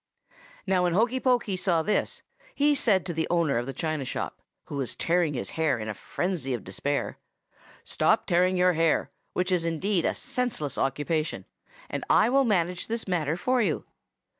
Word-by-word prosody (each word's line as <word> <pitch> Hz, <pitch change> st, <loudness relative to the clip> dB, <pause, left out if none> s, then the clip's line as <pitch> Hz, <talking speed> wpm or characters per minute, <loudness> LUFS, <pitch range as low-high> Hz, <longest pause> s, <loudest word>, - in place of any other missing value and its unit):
"Now 190 Hz, -2 st, +2 dB
when 175 Hz, -1 st, +2 dB
Hokey 235 Hz, +7 st, +2 dB
Pokey 245 Hz, -6 st, +1 dB
saw 180 Hz, -3 st, +1 dB
this, 210 Hz, -, -1 dB, 0.3 s
he 290 Hz, +1 st, +4 dB
said 210 Hz, -9 st, +3 dB
to 175 Hz, -, -3 dB
the 160 Hz, 0 st, -1 dB
owner 165 Hz, -8 st, +2 dB
of 120 Hz, -, -4 dB
the -, -, -2 dB
china 155 Hz, +2 st, -2 dB
shop, 130 Hz, -, -4 dB, 0.2 s
who 145 Hz, -, -6 dB
was 135 Hz, -3 st, -3 dB
tearing 170 Hz, -3 st, +1 dB
his 120 Hz, -, -3 dB
hair 160 Hz, -5 st, +1 dB
in 110 Hz, -1 st, -5 dB
a 105 Hz, -, -2 dB
frenzy 155 Hz, -, -2 dB
of 115 Hz, -, -7 dB
despair, 140 Hz, +10 st, -2 dB, 0.6 s
'Stop -, -, +2 dB
tearing 180 Hz, +1 st, +2 dB
your 180 Hz, 0 st, +4 dB
hair, 165 Hz, -1 st, +1 dB, 0.2 s
which 180 Hz, +1 st, -1 dB
is 180 Hz, -2 st, +2 dB
indeed 170 Hz, +3 st, 0 dB
a -, -, +1 dB
senseless 245 Hz, -, -2 dB
occupation, 150 Hz, +4 st, -1 dB, 0.4 s
and -, -, -4 dB
I -, -, +5 dB
will 270 Hz, +1 st, +4 dB
manage 180 Hz, -5 st, 0 dB
this 230 Hz, -1 st, -3 dB
matter 165 Hz, -3 st, 0 dB
for 255 Hz, +6 st, +1 dB
you. 180 Hz, -9 st, 0 dB
175 Hz, 180 wpm, -27 LUFS, 150-200 Hz, 0.6 s, I